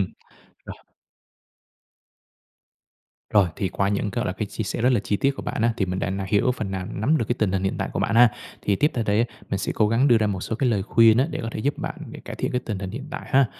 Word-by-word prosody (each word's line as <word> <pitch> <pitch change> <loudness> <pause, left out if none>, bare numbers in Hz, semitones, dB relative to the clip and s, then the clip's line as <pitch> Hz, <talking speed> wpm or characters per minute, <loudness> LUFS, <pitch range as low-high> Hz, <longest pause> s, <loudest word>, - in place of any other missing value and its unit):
Ừm. 95 - 0 0.6
Rồi. - - -6 2.6
Rồi, 100 -4 +5
thì 95 - -1
qua 100 +2 0
những 100 0 -1
cái, - - -2
gọi - - -2
là, 90 - -1
cái 105 +3 -4
chia 110 - -4
sẻ 110 - -3
rất 125 +2 +4
là 120 - +2
chi 105 - -1
tiết 135 +6 +2
của - - -6
bạn 110 - -3
á, 115 - +3
thì 95 - 0
mình 90 +1 -3
đã 95 - -1 0.2
hiểu 105 +5 +3
phần 100 -5 -3
nào, 95 -1 -4
nắm 130 +10 +1
được 115 - 0
cái 120 - +1
tình 105 -4 +1
hình 95 -1 0
hiện 95 - 0
tại - - -2
của - - -2
bạn - - 0
ha. 120 +1 +8 0.3
Thì 100 - +1
tiếp 150 +7 +2
theo 115 - -1
đây 105 0 +2
á, 120 - +4 0.3
mình 95 - 0
sẽ 95 - -2
cố 105 - +3
gắng 120 +6 +3
đưa 120 -3 +6
ra 110 - +1
một 100 -3 -2
số 110 - -3
cái 130 0 +1
lời 105 -4 +1
khuyên 115 +2 +5
á, 135 - +3
để 150 - -4
có - - -3
thể - - -4
giúp 140 +5 -1
bạn - - -4 0.3
cải - - -7
thiện - - -2
cái 125 - 0
tình 110 -5 -4
hình 95 -1 -5
hiện 135 +8 -7
tại - - -5
ha. 135 -2 +4
110 Hz, 285 wpm, -24 LUFS, 100-120 Hz, 2.6 s, ha